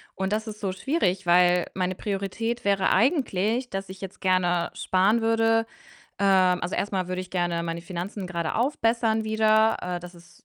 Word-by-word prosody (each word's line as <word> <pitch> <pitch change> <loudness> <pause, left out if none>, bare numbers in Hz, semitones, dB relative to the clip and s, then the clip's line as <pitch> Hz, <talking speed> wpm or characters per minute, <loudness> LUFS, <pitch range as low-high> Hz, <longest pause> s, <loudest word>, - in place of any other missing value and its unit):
Und 190 +1 -2
das 220 +1 -2
ist 215 -1 -7
so 195 -3 -2
schwierig, 190 - -1
weil 175 0 +4
meine 185 0 -2
Priorität 215 +5 -3
wäre 200 -1 +2
eigentlich, 245 - +1
dass 195 0 -5
ich 190 0 -10
jetzt 195 +1 -8
gerne 180 -2 +1
sparen 195 +5 +2
würde. 225 0 +2 0.5
Ähm, 190 -2 +3
also, 175 - -2
erst 205 - -2
mal 185 -2 -1
würde 185 0 -2
ich 185 -1 -9
gerne 175 -2 -1
meine 170 0 -4
Finanzen 185 +2 -5
gerade 170 -3 -3
aufbessern 225 -3 +1
wieder. 220 0 +3
Äh, 180 -1 -3
das 175 +1 -11
ist 170 -1 -19
195 Hz, 180 wpm, -25 LUFS, 180-220 Hz, 0.5 s, weil